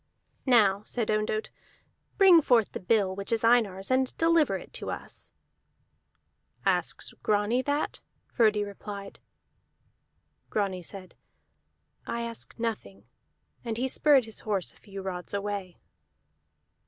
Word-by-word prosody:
"Now," 205 Hz, -6 st, +5 dB
said 230 Hz, -1 st, -2 dB
Ondott, 215 Hz, 0 st, -1 dB, 0.7 s
"bring 375 Hz, -5 st, +8 dB
forth 240 Hz, -6 st, +3 dB
the -, -, -5 dB
bill 190 Hz, 0 st, +1 dB
which 200 Hz, +2 st, -5 dB
is 230 Hz, -1 st, +1 dB
Einar's, 220 Hz, -4 st, +2 dB
and 260 Hz, 0 st, +1 dB
deliver 330 Hz, -2 st, +3 dB
it -, -, -13 dB
to -, -, -4 dB
us." -, -, -7 dB, 1.3 s
"Asks -, -, 0 dB
Grani 210 Hz, +4 st, +2 dB
that?" 285 Hz, +3 st, -1 dB, 0.3 s
Frodi 215 Hz, -3 st, +2 dB
replied. 200 Hz, 0 st, -8 dB, 1.3 s
Grani 195 Hz, -4 st, -1 dB
said, 185 Hz, +2 st, -9 dB, 0.9 s
"I 235 Hz, -, -2 dB
ask 230 Hz, -1 st, -6 dB
nothing." 205 Hz, -, -4 dB, 0.6 s
And 230 Hz, -2 st, -3 dB
he 255 Hz, +2 st, 0 dB
spurred 275 Hz, -1 st, +4 dB
his 220 Hz, -, -6 dB
horse 200 Hz, -4 st, -2 dB
a -, -, -22 dB
few 195 Hz, -2 st, -9 dB
rods 180 Hz, 0 st, -5 dB
away. 200 Hz, -3 st, -4 dB
215 Hz, 120 wpm, -28 LUFS, 195-240 Hz, 1.3 s, bring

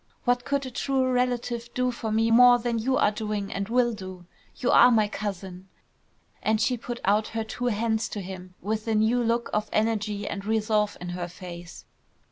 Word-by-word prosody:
What 245 Hz, 0 st, +1 dB
could 280 Hz, 0 st, -1 dB
a 260 Hz, -, -6 dB
true 260 Hz, 0 st, 0 dB
relative 245 Hz, -1 st, -1 dB
do 250 Hz, 0 st, +1 dB
for 225 Hz, -2 st, -4 dB
me 225 Hz, +1 st, +2 dB
more 245 Hz, +1 st, +8 dB
than 235 Hz, -1 st, -2 dB
you 260 Hz, +4 st, +1 dB
are 210 Hz, -, +3 dB
doing 210 Hz, -2 st, -3 dB
and 195 Hz, +1 st, -3 dB
will 240 Hz, 0 st, +2 dB
do. 185 Hz, -3 st, -9 dB, 0.3 s
You 250 Hz, -, 0 dB
are 245 Hz, -, +8 dB
my 220 Hz, -3 st, +3 dB
cousin!" 190 Hz, -3 st, -6 dB, 0.7 s
And 220 Hz, 0 st, +1 dB
she 250 Hz, +3 st, +2 dB
put 240 Hz, 0 st, -6 dB
out 210 Hz, +2 st, +2 dB
her 225 Hz, -, 0 dB
two 230 Hz, +3 st, -5 dB
hands 220 Hz, 0 st, 0 dB
to 205 Hz, -, -5 dB
him 185 Hz, -1 st, -9 dB
with 215 Hz, +2 st, -2 dB
a 220 Hz, -, +1 dB
new 220 Hz, +3 st, +3 dB
look 235 Hz, 0 st, 0 dB
of 210 Hz, 0 st, -1 dB
energy 210 Hz, -2 st, 0 dB
and 195 Hz, -, -4 dB
resolve 215 Hz, -1 st, 0 dB
in 180 Hz, -, -6 dB
her 175 Hz, 0 st, -4 dB
face. 175 Hz, -1 st, -10 dB
220 Hz, 195 wpm, -26 LUFS, 205-240 Hz, 0.7 s, more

